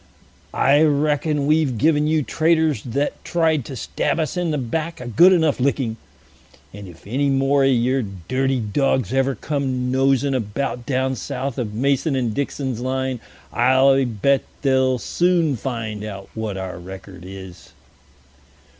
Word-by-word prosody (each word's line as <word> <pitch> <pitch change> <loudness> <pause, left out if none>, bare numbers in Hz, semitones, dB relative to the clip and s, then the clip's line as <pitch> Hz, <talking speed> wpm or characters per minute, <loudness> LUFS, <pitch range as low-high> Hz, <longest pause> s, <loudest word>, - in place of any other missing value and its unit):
"I 140 +3 +4
reckon 150 -1 +1
we've 150 -5 +2
given 150 +2 +2
you 155 -1 +2
traitors 160 -4 +1
that 135 +6 -3
tried 160 -6 +1
to 135 - -7
stab 145 - -2
us 155 0 -2
in 175 -2 -1
the 150 - 0
back 155 +6 -3
a 125 - -7
good 120 - +5
enough 160 -6 +2
licking; 130 -3 0 0.8
and 100 0 -9
if 85 -2 -15
any 135 +7 0
more 135 +1 +2
of 135 - +4
your 130 +2 +2
dirty 130 +7 -2
dogs 125 0 0
ever 135 0 +1
come 130 -4 -2
nosing 135 +1 +2
about 125 +1 -3
down 130 -1 0
south 130 +3 -4
of 105 -4 -4
Mason 140 +4 +1
and 120 -4 -1
Dixon's 135 -2 -3
Line, 130 0 -2 0.3
I 135 +1 +4
bet 125 +4 +1 0.2
they'll 130 -2 +2
soon 170 +1 +1
find 110 -4 -4
out 100 -2 -7
what 110 -3 -4
our 95 -2 -5
record 95 0 -10
is." 95 -1 -11
130 Hz, 150 wpm, -21 LUFS, 115-145 Hz, 0.8 s, good